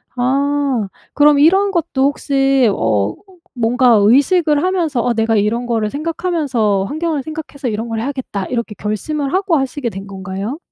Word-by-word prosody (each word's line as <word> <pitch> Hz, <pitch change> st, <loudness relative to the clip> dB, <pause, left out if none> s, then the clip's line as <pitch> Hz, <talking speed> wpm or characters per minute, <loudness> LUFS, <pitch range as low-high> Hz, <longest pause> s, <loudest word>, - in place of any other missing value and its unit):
아. 270 Hz, -2 st, 0 dB, 0.3 s
그럼 290 Hz, 0 st, +5 dB
이런 385 Hz, +6 st, +4 dB
것도 315 Hz, -6 st, -1 dB
혹시 275 Hz, -3 st, +2 dB
어 105 Hz, -3 st, 0 dB, 0.4 s
뭔가 240 Hz, -1 st, +3 dB
의식을 290 Hz, -, +3 dB
하면서 330 Hz, -10 st, 0 dB
'아 240 Hz, -, +2 dB
내가 225 Hz, 0 st, +1 dB
이런 220 Hz, +4 st, 0 dB
거를 225 Hz, -3 st, -1 dB
생각하면서 285 Hz, -, -1 dB
환경을 310 Hz, -1 st, -2 dB
생각해서 305 Hz, -4 st, -6 dB
이런 225 Hz, +1 st, -3 dB
걸 225 Hz, -, -2 dB
해야겠다.' 245 Hz, -6 st, -4 dB
이렇게 235 Hz, -4 st, -3 dB
결심을 275 Hz, -, -3 dB
하고 375 Hz, -2 st, +1 dB
하시게 270 Hz, -2 st, -2 dB
된 195 Hz, 0 st, -8 dB
건가요? 195 Hz, +6 st, -5 dB
265 Hz, 330 characters per minute, -17 LUFS, 220-300 Hz, 0.4 s, 그럼